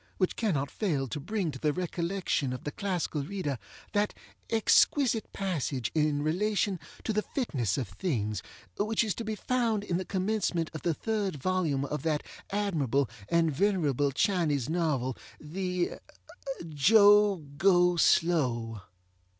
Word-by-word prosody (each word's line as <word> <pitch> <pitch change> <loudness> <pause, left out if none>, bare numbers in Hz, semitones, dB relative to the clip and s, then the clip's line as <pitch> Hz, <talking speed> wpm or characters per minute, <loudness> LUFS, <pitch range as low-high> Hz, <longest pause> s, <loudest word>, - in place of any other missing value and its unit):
which 185 - +1
cannot 150 -12 0
fail 150 -11 -1
to 140 - -4
bring 185 +2 -2
to 130 - -9
the 150 - +1
recollection 170 -4 -1
of 125 - -7
the 145 - -3
classical 175 -6 -2
reader 145 - -3 0.3
that 205 0 +1 0.3
exquisite 225 +1 +3
passage 150 - -2
in 150 -2 +1
relation 195 +3 0 0.2
to 220 - -1
the 215 - +2
fitness 135 - -2
of 130 - -2
things, 105 - -2 0.4
which 215 +2 +2
is 215 -4 -1
to 230 - -5
be 220 -1 -3
found 230 -2 0
in 175 -4 -1
the 185 - -2
commencement 185 -4 -1
of 155 - -6
the 170 -3 0
third 210 -4 -1
volume 150 -3 0
of 150 +2 -3
that 155 -2 0 0.3
admirable 150 - 0 0.2
and 165 -1 +3
venerable 150 -6 +2
Chinese 150 - +1
novel 150 -7 0 0.2
the 180 +3 -2 0.8
Jo 205 +5 +6 0.2
Go 180 0 +4
Slow. 125 - +2
175 Hz, 140 wpm, -29 LUFS, 145-200 Hz, 0.8 s, Jo